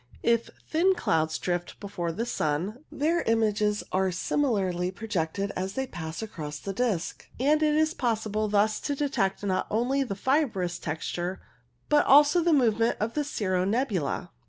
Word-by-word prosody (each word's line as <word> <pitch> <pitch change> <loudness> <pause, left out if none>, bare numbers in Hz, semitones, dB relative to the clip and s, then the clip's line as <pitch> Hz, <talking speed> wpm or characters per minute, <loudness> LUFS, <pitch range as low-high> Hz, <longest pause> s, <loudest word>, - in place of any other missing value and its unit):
If 235 -1 +2 0.2
thin 365 +4 +3
clouds 160 - 0
drift 175 -1 -3
before 180 -4 -3
the 225 +8 -3
sun, 190 - -2
their 325 +4 +1
images 210 -2 +1
are 190 0 +2
similarly 185 -3 0
projected 195 -2 -2
as 190 +1 -3
they 265 +4 -1
pass 160 -5 -6
across 150 -8 -7
its 195 - -2
disc, 210 -7 -2
and 300 +4 +3
it 305 -1 +3
is 315 +1 +2
possible 215 -4 -1
thus 210 +1 +2
to 285 - -2
detect 270 -10 -1
not 190 -2 0
only 245 +5 +1
the 240 -7 -2
fibrous 215 - 0
texture 175 +4 -3 0.5
but 295 0 +4
also 295 +5 +6
the 340 0 +2
movement 230 -5 +3
of 220 +2 -1
cirro 185 -10 -1
nebula. 200 - -1
210 Hz, 155 wpm, -27 LUFS, 185-265 Hz, 0.5 s, also